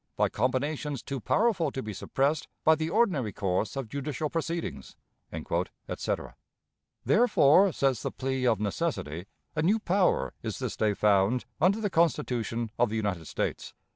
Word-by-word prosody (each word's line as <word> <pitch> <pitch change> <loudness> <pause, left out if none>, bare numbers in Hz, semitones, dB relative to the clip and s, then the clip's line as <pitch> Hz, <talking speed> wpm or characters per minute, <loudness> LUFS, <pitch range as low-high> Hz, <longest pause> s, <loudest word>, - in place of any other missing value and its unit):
by - - +3
combinations 135 +3 -1
too 135 -1 -4
powerful 190 - +2
to 130 - -4
be 110 - -5
suppressed 140 +9 0 0.2
by 160 - +6
the 160 0 -1
ordinary 175 - +2
course 95 +4 -1
of 135 -3 -3
judicial 140 +4 -3
proceedings," 165 +1 -4 0.9
etc. - - -3 0.7
Therefore, 195 - +5
says 135 -7 +1
the - - -2
plea 130 -1 -2
of 110 -4 +3
necessity, 100 - -2 0.3
a 150 - +1
new 195 +8 +3
power 180 - +1
is - - -4
this - - -3
day 105 -2 +1
found 105 +4 +3 0.2
under 190 +6 +4
the 205 -3 -1
Constitution 125 -9 0
of 120 -2 +4
the 110 - -3
United 100 -7 -2
States. - - -3
135 Hz, 150 wpm, -28 LUFS, 110-165 Hz, 0.9 s, by